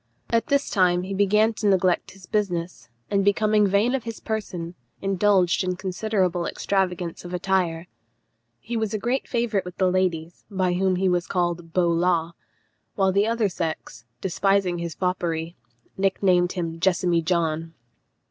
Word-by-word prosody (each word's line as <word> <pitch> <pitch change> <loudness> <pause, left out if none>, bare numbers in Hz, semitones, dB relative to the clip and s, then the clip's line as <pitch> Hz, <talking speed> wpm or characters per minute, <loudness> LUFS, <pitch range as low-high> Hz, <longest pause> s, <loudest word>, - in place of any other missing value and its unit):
At 230 -1 +2
this 280 -1 +1
time 180 -3 +3
he 195 +1 -5
began 210 +3 +3
to 215 -1 -2
neglect 185 -2 +2
his 190 -1 -15
business, 180 - -2 0.2
and 200 -1 +2
becoming 210 +1 +3
vain 200 +6 +2
of 265 -3 -1
his 230 -1 -6
person, 180 -6 -4 0.3
indulged 195 -1 +2
in 185 0 -1
considerable 185 -2 -1
extravagance 180 -3 -2
of 180 0 -5
attire. 180 -2 0 0.7
He 235 - -6
was 220 -2 -1
a - - +1
great 240 +5 -1
favourite 230 -5 0
with 180 -1 -9
the 185 -1 +2
ladies, 175 -3 -1
by 185 -3 0
whom 185 +1 +1
he 190 +1 +1
was 180 -1 +1
called 175 -2 -2
Beau 175 -2 +3
Law; 170 -1 +1 0.6
while 190 -1 +2
the 200 +3 +2
other 230 -2 +1
sex, 160 -9 -5 0.2
despising 190 -1 +1
his 170 -1 -4
foppery, 170 -2 -2 0.4
nicknamed 185 -2 +2
him 165 -2 -4
Jessamy 175 -2 +2
John. 165 -1 -1
185 Hz, 155 wpm, -24 LUFS, 175-200 Hz, 0.7 s, time